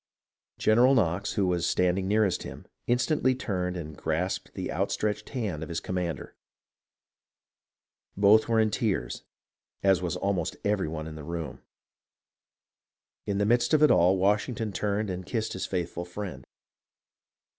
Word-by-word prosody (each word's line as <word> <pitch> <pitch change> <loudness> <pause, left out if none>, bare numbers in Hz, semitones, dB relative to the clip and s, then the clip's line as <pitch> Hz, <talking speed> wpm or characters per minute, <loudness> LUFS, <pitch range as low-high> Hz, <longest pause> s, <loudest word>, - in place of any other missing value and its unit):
General 125 +5 +5
Knox, 100 -2 +1
who 100 -3 +1
was 90 -2 0
standing 90 +1 +1
nearest 100 -3 +2
him, - - -9 0.2
instantly 130 +2 +2
turned 90 -7 -2
and 80 -3 -7
grasped 90 +4 -2
the - - -4
outstretched 105 -1 -1
hand 105 - -3
of 80 - -6
his 85 0 -2
com - - -6
mander. 85 -6 -3 1.8
Both 105 +2 +5
were 115 -1 +3
in 110 -1 +3
tears, 105 -2 -1 0.6
as 95 -2 +4
was 90 -2 -2
almost 95 -4 -1
every 100 -4 +1
one 80 0 -5
in 80 - -7
the 75 -1 -8
room. 85 -2 -5 1.7
In 100 - 0
the 100 - +2
midst 120 +6 +3
of 155 - +4
it 150 - +7
all, 90 +3 +5
Washington 105 +3 0
turned 105 0 -1
and 90 0 -5
kissed 110 +4 -2
his 95 - -3
faithful 85 -1 -3
friend. 90 -7 -7
95 Hz, 145 wpm, -28 LUFS, 90-110 Hz, 1.8 s, it